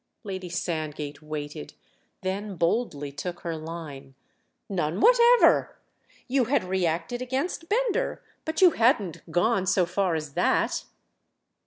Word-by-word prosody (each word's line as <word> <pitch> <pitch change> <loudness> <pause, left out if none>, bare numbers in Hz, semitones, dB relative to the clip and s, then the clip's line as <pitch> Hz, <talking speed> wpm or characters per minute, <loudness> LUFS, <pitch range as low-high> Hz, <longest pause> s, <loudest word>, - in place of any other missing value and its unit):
Lady 190 -3 -5
Sandgate 155 -4 -4
waited—then 155 - -7
boldly 165 - 0
took 175 +5 -6
her 170 -2 -3
line. 155 -4 -8 0.5
"None 175 -2 -1
whatever! 485 - +5 0.5
You 255 -1 +2
had 260 -1 +1
reacted 185 +5 -1
against 275 +7 -3
Bender—but 440 -7 -1
you 360 - +8
hadn't 225 - +1
gone 190 +3 +2
so 185 -1 +3
far 180 0 0
as 155 -3 -4
that!" - - +1
185 Hz, 110 wpm, -26 LUFS, 155-245 Hz, 0.5 s, you